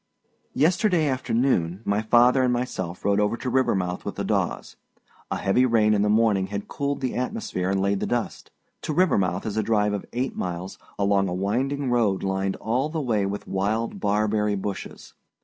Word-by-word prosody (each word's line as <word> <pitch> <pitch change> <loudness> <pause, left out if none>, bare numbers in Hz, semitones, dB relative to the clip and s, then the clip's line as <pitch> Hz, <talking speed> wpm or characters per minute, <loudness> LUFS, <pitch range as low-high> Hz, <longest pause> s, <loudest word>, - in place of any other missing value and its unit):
Yesterday 175 0 +2
afternoon 120 -8 0
my 100 +1 +1
father 120 +4 +4
and 125 -1 +2
myself 95 -9 -3
rode 100 0 +3
over 105 +3 +1
to 125 - -4
Rivermouth 95 -9 0
with - - -5
the - - -3
Daws. - - -2 0.5
A - - -2
heavy 100 +6 +2
rain 110 -4 +3
in 105 - +2
the 105 - +2
morning 105 -3 +3
had 100 0 -5
cooled 140 0 -3
the 130 - -1
atmosphere 125 - -2
and 95 0 +1
laid 100 0 +1
the - - -2
dust. 120 -1 -3 0.3
To 155 - -3
Rivermouth 155 - +2
is 110 -1 -3
a - - +3
drive 105 -2 +1
of 100 - -4
eight 125 +3 -2
miles, 90 +1 -5 0.2
along 100 -1 +2
a 90 - -2
winding 130 +8 -1
road 110 -6 +1
lined 95 0 -1
all 125 +6 -1
the 160 0 -3
way 110 -8 0
with 100 +1 -5
wild 105 +4 -1
barberry 105 0 +1
bushes. 100 0 -6
105 Hz, 185 wpm, -24 LUFS, 100-125 Hz, 0.5 s, father